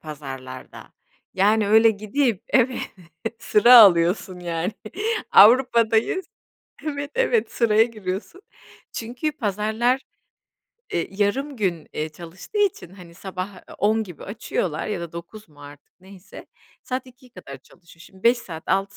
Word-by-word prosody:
pazarlarda, 135 -4 -9 0.4
yani 205 +2 +2
öyle 220 +2 +6
gidip, 215 +1 -1
evet, 255 -1 +2 0.6
sıra 235 +2 +6
alıyorsun 180 -2 +4
yani, 170 +2 -3 0.6
Avrupa'dayız, 235 - +5 0.6
evet, 285 -1 -4
evet 480 -2 +1
sıraya 220 -2 +3
giriyorsun. 215 - -6 0.5
Çünkü 245 +7 -4
pazarlar, 220 +1 -1 0.9
eee, 170 - -1
yarım 230 +9 -1
gün, 180 -8 -2
eee, 155 +1 -3
çalıştığı 170 - -9
için, 390 - 0
hani, 180 -3 -14
sabah, 190 +2 -6
eee, - - -14
10.00 220 +2 +2
gibi 175 -7 -11
açıyorlar 185 -6 -3
ya 210 -4 -3
da 170 -1 -7
09.00 170 +5 -10
mu 145 -1 -18
artık 145 +4 -15
neyse, 190 0 -14 0.4
saat 255 +1 -4
14.00'e 255 0 -18
kadar 140 - -10
çalışıyor. 170 +5 -21
Şimdi 190 +3 -18
5 240 +1 +4
saat 165 -8 -9
6 195 +1 -1
205 Hz, 130 wpm, -23 LUFS, 175-235 Hz, 0.9 s, öyle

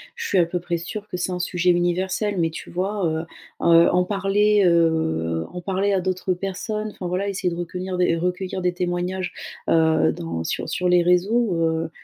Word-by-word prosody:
je 470 - -5
suis 195 - +1
à 175 - +5
peu 175 +1 -3
près 175 -1 -2
sûre 205 +5 -7
que 180 - -4
c'est 180 +1 -2
un 180 - -3
sujet 180 0 +1
universel 185 +3 0
mais 165 -1 +2
tu 160 - -9
vois, 195 +2 -2
heu, 160 0 -1 0.4
heu, 170 0 +6
en 180 0 +2
parler, 205 +1 +2
heu, 160 - +1
en 180 - -6
parler 195 +2 0
à 195 - +2
d'autres 185 0 -1
personnes, 210 +3 -4
enfin 185 -3 -6
voilà 185 +3 -1
essayer 185 -3 -1
de 170 - -6
recueillir- 180 +1 -4 0.2
recueillir 180 +1 -2
des 180 0 +1
témoignages, 180 +1 -2 0.4
heu, 160 -1 +3
dans 80 0 -5
sur - - -3
sur 180 - -1
les 180 -1 +4
réseaux, 185 +4 +2
heu, 165 0 0
180 Hz, 195 wpm, -23 LUFS, 170-190 Hz, 0.4 s, heu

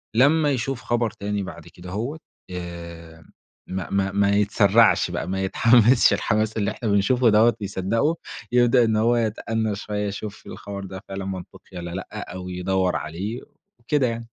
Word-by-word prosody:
لمّا 145 +4 +4
يشوف 130 0 -2
خبر 120 -1 0
تاني 100 0 -3
بعد - - -9
كدهوّة 105 - -6 0.3
آآ 85 -2 -8 0.4
ما 95 -1 -4
ما 100 -1 0
ما 100 +1 +2
يتسرعش 105 +2 +4
بقى، - - -3
ما 95 +1 -2
يتحمسش 115 +5 +5
الحماس 110 0 0
اللي 100 0 0
إحنا 115 -1 -4
بنشوفه 115 +5 +3
دوّة 110 +3 +5
ويصدقه. 100 - 0 0.4
يبدأ 120 0 +4
إن 110 -1 +1
هو 115 +3 +3
يتأنَّى 110 -1 -1
شوية، 105 0 -3
يشوف 100 +1 -7
الخبر 100 -1 -7
ده 95 0 -8
فعلًا 95 0 -5
منطقي 95 -1 -8
والّا 85 0 -6
لأ، 95 -1 -7
أو 90 0 -6
يدوّر 90 0 0
عليه، 100 +10 -4 0.4
وكده 135 +1 +1
يعني. 115 0 -4
105 Hz, 155 wpm, -23 LUFS, 95-115 Hz, 0.4 s, يتحمسش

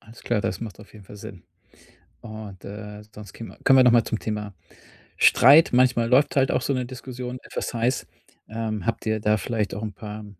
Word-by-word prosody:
Alles 115 +1 -16
klar, 120 -3 0
das 95 - -3
macht 110 -3 -8
auf 105 - -16
jeden 105 -2 -14
Fall 105 - -12
Sinn. 95 -3 -11 0.8
Und, 110 -4 -10
äh, 105 +1 -9
sonst 105 -2 -11
käm 115 - -10
kommen 135 - +6
wir 130 - +7
noch 125 - +6
mal 120 -1 +5
zum 110 - -3
Thema 105 -2 -4 0.6
Streit. 145 +5 +6
Manchmal 125 -2 +3
läuft 135 +3 +3
halt 135 -1 +3
auch - - 0
so 140 - -1
'ne 125 -2 -2
Diskussion 125 0 -7
etwas - - -5
heiß. 120 +3 0 0.4
Ähm, 110 -3 -4
habt 115 - -2
ihr 110 -1 0
da 105 0 +2
vielleicht 105 -1 -2
auch 105 - -6
'n 105 - -4
paar 105 0 -8
110 Hz, 210 wpm, -24 LUFS, 105-125 Hz, 0.8 s, wir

